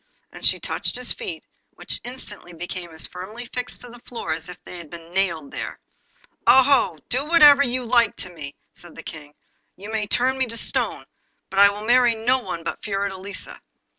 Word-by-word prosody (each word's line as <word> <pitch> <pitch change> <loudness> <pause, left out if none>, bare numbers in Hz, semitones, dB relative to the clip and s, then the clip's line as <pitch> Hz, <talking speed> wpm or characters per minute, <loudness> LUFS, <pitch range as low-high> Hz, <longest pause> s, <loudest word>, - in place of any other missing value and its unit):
And - - -12
she - - +4
touched - - -2
his - - -1
feet, 380 -9 -6 0.3
which - - -2
instantly 225 -7 -7
became 175 +1 -6
as 160 -1 -3
firmly 210 +7 -8
fixed 250 +1 -4
to 245 - -8
the 240 0 -12
floor 230 -10 -4
as 160 +2 -6
if 180 - -8
they 180 - -8
had 170 -3 -10
been 170 +1 -11
nailed 170 -7 0
there. - - -5 0.7
'Oh! 265 - +6
do 255 +3 +2
whatever 295 -3 +8
you 250 -2 0
like 235 -2 +3
with 180 - -7
me,' 145 -4 -8 0.2
said 175 -1 -15
the - - -9
King; 150 -2 -9 0.4
'you 205 +4 -8
may 215 -1 -1
turn 260 +5 +2
me 260 - +2
to 230 0 -3
stone, - - -2 0.5
but 195 - 0
I 200 0 +9
will 205 +1 -6
marry 240 0 +5
no 245 +4 +2
one 170 -9 -5
but - - -4
Fiordelisa. 200 -1 -4
210 Hz, 195 wpm, -23 LUFS, 175-250 Hz, 0.7 s, I